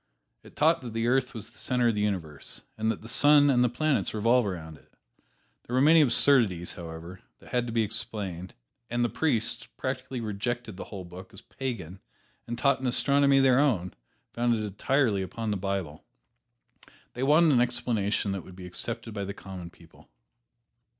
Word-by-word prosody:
It - - -17
taught 160 0 +3
that 120 -3 -7
the 115 0 -1
earth 125 0 +1
was 110 - -7
the - - -16
center 125 -2 +1
of - - +1
the 105 - -1
universe, 85 -9 -3
and 110 0 -1
that 115 - -3
the - - -9
sun 145 +3 +5
and 125 -2 +4
the 125 - +3
planets 140 0 0
revolve 115 +2 +3
around 80 -5 -6
it. - - -28 0.7
There 120 - -5
were - - +4
many 155 +4 +6
absurdities, 115 - +3
however, 85 +2 -9 0.2
that - - -17
had 125 -1 0
to - - -4
be 115 0 +2
explained, 105 -5 -4 0.3
and 120 0 0
the - - 0
priests 115 -7 -1
practically 130 0 -4
rejected 115 +1 -3
the - - -7
whole 95 -3 -8
book 90 +2 -11
as - - -10
"pagan" 100 -9 -6 0.5
and 120 - -4
taught 140 +2 +2
an 130 - -2
astronomy 140 +2 +3
of 135 - +5
their 130 -1 +5
own, 100 - +1 0.4
founded 120 -2 +1
entirely 105 +1 +1
upon 110 +3 -4
the - - 0
Bible. 95 -5 -3 1.1
They 125 - -6
wanted 155 +4 +5
an 125 -3 +4
explanation 110 -4 0
that 95 -1 -3
would 95 - -13
be 90 -1 -9
accepted 110 +5 -5
by 100 -1 -3
the 100 +1 -6
common 95 -4 -8
people. 85 -1 -20
115 Hz, 185 wpm, -28 LUFS, 95-130 Hz, 1.1 s, many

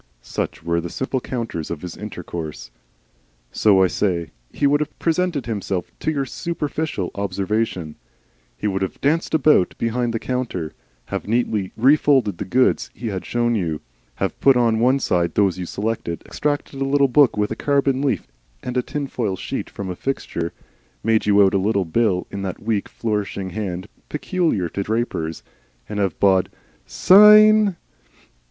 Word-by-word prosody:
Such - - -4
were 85 0 0
the 85 - -5
simple 130 +6 -2
counters 115 -12 -4
of 85 -1 -5
his 90 -2 -6
intercourse. 85 - -7 0.8
So, 95 - +4
I - - +6
say, 90 -2 -1 0.2
he 145 - -1
would 145 +1 +4
have 150 0 -4
presented 165 -5 0
himself 100 -5 -3
to - - -1
your 140 -3 0
superficial 150 - -3
observation. 100 -3 -2 0.6
He - - -6
would 95 -2 0
have 95 - -3
danced 160 +3 +1
about 150 - +4
behind 115 +1 -1
the 115 - -1
counter, 115 -10 -3 0.4
have - - -3
neatly 110 -4 0
refolded 130 - +3
the - - -3
goods 125 +5 +2
he 115 - -4
had 95 -3 -5
shown 120 0 +1
you, 85 -8 -1 0.4
have - - -3
put 135 -2 +5
on 115 -2 +2
one 130 +3 +4
side 85 -9 0
those 95 -3 +2
you 90 - -4
selected, 100 -5 -3
extracted 145 -2 -3
a - - +3
little 140 0 +3
book 135 -2 +4
with 105 0 0
a - - -1
carbon 140 0 +1
leaf 130 - 0 0.4
and 125 0 -3
a - - +3
tinfoil 125 -7 -3
sheet - - -5
from 95 -2 -6
a - - -5
fixture, 85 -9 -3 0.5
made 110 0 +2
you 100 0 +6
out 95 - +3
a 100 - +3
little 100 -1 +1
bill 95 +1 +1
in 100 - -5
that 95 -2 -4
weak 105 -2 -1
flourishing 105 -4 -3
hand 95 -2 -4 0.2
peculiar 155 - 0
to 100 - -4
drapers, 100 -7 -2 0.4
and 105 -1 -4
have 95 -5 -1
bawled 95 -2 +3 0.4
"Sayn!" 210 0 +7
110 Hz, 165 wpm, -21 LUFS, 95-135 Hz, 0.8 s, Sayn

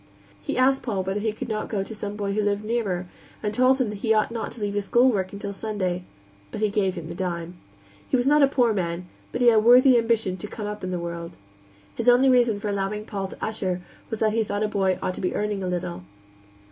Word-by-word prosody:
He - - -3
asked 265 +1 +3
Paul 200 -6 -2
whether 190 +2 -2
he 220 +1 0
could 215 - -6
not 215 -2 -3
go 200 -3 -1
to 220 - -8
some 205 -1 -5
boy 200 -1 -2
who 215 - +1
lived 205 0 0
nearer, 205 -6 -1 0.4
and 210 0 -1
told 255 +3 +4
him 250 -4 +1
that 210 -1 -6
he 220 +1 +2
ought 215 +1 +2
not 230 -1 -4
to - - -8
leave 205 -1 -1
his 205 -1 -1
schoolwork 215 -6 +3
until 200 0 -5
Sunday; 190 -4 -3 0.4
but - - -6
he 215 -1 +1
gave 195 -2 +1
him 170 -3 -6
the 170 - -6
dime. 175 -1 -4 0.5
He - - +3
was 245 - 0
not 295 +2 +5
a 280 - +7
poor 245 -4 +2
man, 175 -2 -2 0.3
but 245 - -3
he 245 - +7
had 225 - +4
a - - +7
worthy 245 +3 +7
ambition 225 -5 0
to 200 - -6
come 210 0 -6
up 210 -1 -5
in 185 - -2
the 180 - -2
world. 170 -1 -6 0.6
His 235 - +2
only 250 +2 +6
reason 240 -5 +4
for 210 - -4
allowing 200 +1 -2
Paul 195 -3 -4
to - - -6
usher 190 -5 -2 0.3
was 225 - -4
that 215 -1 +3
he 225 0 +2
thought 205 0 -2
a - - +2
boy 195 -3 +1
ought 185 - -1
to - - -7
be 180 - -1
earning 210 -1 -1
a 185 - -2
little. 170 - -3
210 Hz, 255 wpm, -25 LUFS, 190-225 Hz, 0.6 s, a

